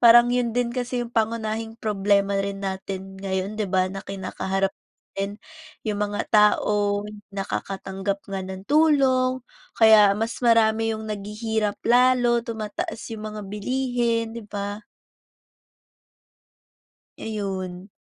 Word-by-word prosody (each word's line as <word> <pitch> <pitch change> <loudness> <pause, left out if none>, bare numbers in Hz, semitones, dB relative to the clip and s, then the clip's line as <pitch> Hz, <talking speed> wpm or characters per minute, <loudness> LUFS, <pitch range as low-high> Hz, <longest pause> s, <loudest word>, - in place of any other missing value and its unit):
parang 240 0 +8
yun 245 -2 +1
din 245 -1 +2
kasi 250 0 -2
yung 235 - -11
pangunahing 225 0 -1
problema 200 -2 +1
rin 195 0 -3
natin 190 0 -5
ngayon, 195 +2 -2
'di 200 - -1
ba, 185 0 +2
na 195 - -5
kinakaharap 195 0 -2 0.4
din. 200 +2 -3 0.4
Yung 215 -2 -1
mga 205 0 -1
tao 210 -1 +3 0.3
nakakatanggap 195 0 -3
nga 195 -1 -3
ng 190 +2 -8
tulong 270 -4 +3
o - - -35 0.4
kaya 215 -2 +8
mas 225 +3 -2
marami 225 -1 +4
yung 220 0 -5
naghihirap 210 +1 -2
lalo, 245 -1 +4
tumataas 230 - -4 0.2
yung 215 - -8
mga 215 - -6
bilihin, 235 +1 -1
'di 230 - -7
ba? 205 +1 -5 2.3
Ayun. 190 -3 -4
215 Hz, 120 wpm, -24 LUFS, 195-235 Hz, 2.3 s, parang